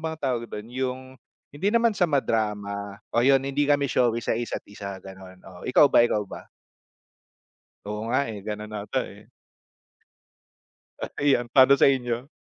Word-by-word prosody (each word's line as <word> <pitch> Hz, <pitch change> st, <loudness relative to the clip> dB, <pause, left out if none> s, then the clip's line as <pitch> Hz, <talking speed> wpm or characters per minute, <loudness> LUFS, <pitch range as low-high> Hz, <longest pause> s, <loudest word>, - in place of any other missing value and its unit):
bang 160 Hz, 0 st, -4 dB
tawag 125 Hz, -4 st, -1 dB
dun, 105 Hz, +2 st, -8 dB
yung 130 Hz, 0 st, -2 dB, 0.5 s
hindi 190 Hz, +8 st, 0 dB
naman 230 Hz, 0 st, +3 dB
sa 195 Hz, -, -2 dB
madrama 105 Hz, -7 st, -2 dB, 0.2 s
o 120 Hz, -, +3 dB
'yon, 135 Hz, +2 st, +5 dB
hindi 140 Hz, +1 st, -1 dB
kami 145 Hz, -1 st, +3 dB
showy 120 Hz, -3 st, +1 dB
sa -, -, 0 dB
isa't 120 Hz, +1 st, -4 dB
isa, 100 Hz, -1 st, -8 dB
gan'on. 95 Hz, -1 st, -12 dB
Oh, 90 Hz, -2 st, -12 dB
ikaw 130 Hz, +3 st, +6 dB
ba, -, -, +6 dB
Ikaw 105 Hz, -3 st, 0 dB
ba? -, -, -10 dB, 1.4 s
Oo 105 Hz, 0 st, -4 dB
nga, 130 Hz, -, +3 dB
eh. 105 Hz, -3 st, -6 dB
Ganun 105 Hz, 0 st, -6 dB
ata, 105 Hz, 0 st, -2 dB
eh. -, -, -15 dB, 1.7 s
Ah, -, -, -2 dB
ayan, 135 Hz, -4 st, +2 dB
pa'no 135 Hz, 0 st, +7 dB
sa -, -, +6 dB
inyo? 125 Hz, -1 st, 0 dB
120 Hz, 160 wpm, -25 LUFS, 105-135 Hz, 1.7 s, pa'no